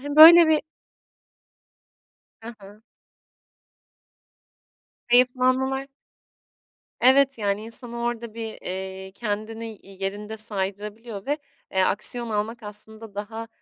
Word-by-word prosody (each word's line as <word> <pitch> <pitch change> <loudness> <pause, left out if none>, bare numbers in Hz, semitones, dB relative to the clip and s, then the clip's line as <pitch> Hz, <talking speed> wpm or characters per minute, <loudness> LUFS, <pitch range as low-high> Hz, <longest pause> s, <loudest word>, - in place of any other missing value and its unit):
Hani, 290 +2 -5
böyle 330 +1 +10
bir 310 -1 +4 1.8
Hı 235 +1 -8
hı. 205 +2 -15 2.3
Hayıflanmalar. 255 +2 +2 1.1
Evet, 270 +1 +5
yani 205 0 -1
insanı 235 +1 -6
orada 235 -2 -3
bir, 225 -1 -6
eee, 190 +1 -6
kendini 215 +1 -5
y 195 0 -15
yerinde 210 +3 -4
saydırabiliyor 205 +1 -4
ve, 290 +2 0 0.3
eee, 190 -1 +2
aksiyon 230 +5 +2
almak 220 +2 -3
aslında 210 0 -10
daha, 220 +2 -6
225 Hz, 95 wpm, -24 LUFS, 205-245 Hz, 2.3 s, böyle